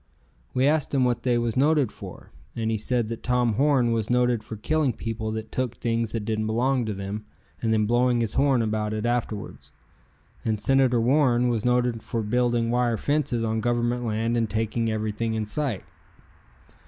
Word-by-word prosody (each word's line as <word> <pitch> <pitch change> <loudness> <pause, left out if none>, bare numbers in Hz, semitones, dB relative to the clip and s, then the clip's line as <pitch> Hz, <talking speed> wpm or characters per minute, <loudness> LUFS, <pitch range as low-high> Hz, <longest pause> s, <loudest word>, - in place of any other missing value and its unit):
We 130 - +3
asked 150 -1 +1
him 130 -2 +3
what 120 -1 0
they 120 -1 +1
was 120 -1 -1
noted 145 -2 +3
for, - - -11 0.2
and 115 -1 -1
he - - +1
said 120 +1 0
that 115 - -5
Tom 125 -2 +1
Horn 130 -1 +3
was 115 -2 -1
noted 125 -2 +2
for 110 - -7
killing 140 +4 0
people 110 0 -4
that 110 0 -6
took 125 -2 -2
things 115 -2 -1
that 110 -3 -3
didn't 110 -1 -1
belong 125 +3 +1
to 105 - -2
them 100 +2 -6 0.3
and 115 - 0
then 110 -1 +2
blowing 120 +2 +2
his 110 -2 -1
horn 135 -3 +3
about 110 -1 -1
it 110 +1 -3
afterwards, 120 -3 -3 0.7
and 110 -2 -1
Senator 130 +1 +3
Warren 125 -1 +3
was 115 -3 -1
noted 125 -2 +1
for 115 0 -3
building 120 +1 +1
wire 120 -1 +1
fences 140 -5 0
on 110 0 -1
government 120 +1 0
Land 115 +1 -1
and 115 -2 0
taking 115 +2 -1
everything 110 +1 -2
in 110 -1 -1
sight. 125 -2 -2
115 Hz, 185 wpm, -25 LUFS, 110-125 Hz, 0.7 s, We